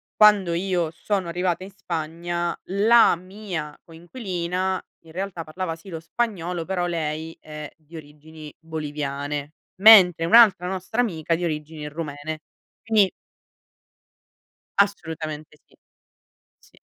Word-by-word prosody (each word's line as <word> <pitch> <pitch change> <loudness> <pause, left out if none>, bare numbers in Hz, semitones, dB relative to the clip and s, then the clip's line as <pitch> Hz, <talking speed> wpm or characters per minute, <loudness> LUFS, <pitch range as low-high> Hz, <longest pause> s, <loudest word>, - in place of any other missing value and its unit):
quando 205 -5 +5
io 175 -1 0
sono 190 +2 -2
arrivata 180 +1 -1
in 195 - -10
Spagna 170 -1 -3
la 215 +4 +5
mia 185 -4 -7
coinquilina 180 +1 -3 0.2
in 160 - -14
realtà 185 -2 -4
parlava 165 +1 -4
sì 165 - -18
lo 165 -3 -5
spagnolo 175 -2 -3
però 180 -1 -1
lei 160 -1 -3
è 150 -1 -9
di 160 +1 -17
origini 155 0 -11
boliviane, 145 -2 -4 0.3
mentre 185 -6 +8
un'altra 200 -2 +6
nostra 190 +5 -1
amica 165 -8 -1
di 175 - -4
origini 150 -1 -4
rumene, 150 0 -6 0.4
quindi 215 -4 +4 1.7
Assolutamente 160 -6 -1
sì. - - -28 0.9
Sì. - - -24
170 Hz, 115 wpm, -24 LUFS, 155-190 Hz, 1.7 s, mentre